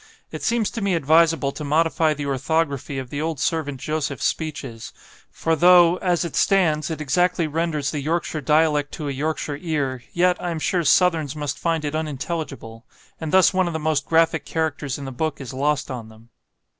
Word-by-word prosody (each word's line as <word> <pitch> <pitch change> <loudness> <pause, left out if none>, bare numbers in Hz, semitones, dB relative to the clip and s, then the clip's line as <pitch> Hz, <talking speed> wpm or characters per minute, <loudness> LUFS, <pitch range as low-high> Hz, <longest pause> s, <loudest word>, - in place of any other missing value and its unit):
It - - -6
seems 230 -3 0
to 230 - -5
me 195 -2 +1
advisable 160 -1 +3
to 150 - -7
modify 160 +1 +2
the 145 0 -5
orthography 140 0 -1
of 130 -2 -6
the 145 - -3
old 160 -3 -2
servant 145 -4 -1
Joseph's 150 -2 -2
speeches; 145 -8 -4 0.4
for 165 0 -1
though, 175 +1 +6
as 180 -2 0
it 170 - -6
stands, 160 -6 +2
it 160 - -4
exactly 170 +4 +1
renders 155 -2 -1
the 150 - -3
Yorkshire 155 +1 -2
dialect 150 0 +2
to 150 - -5
a - - -1
Yorkshire 145 +1 -3
ear, 140 -7 -2
yet, 180 +1 +2
I 175 - -2
am 165 - -3
sure 175 +2 0
Southerns 160 -3 +3
must 145 -2 -4
find 165 -2 -1
it 145 - -3
unintelligible; 150 -6 -5 0.4
and 160 -2 -4
thus 190 +1 +5
one 185 -1 +2
of 170 - -3
the 160 - -2
most 155 -2 0
graphic 165 0 +2
characters 150 -4 -2
in 140 - -7
the 135 - -5
book 155 +3 -3
is 135 -2 -7
lost 145 +1 0
on 115 -3 -6
them. 110 +1 -18
155 Hz, 195 wpm, -22 LUFS, 140-165 Hz, 0.4 s, though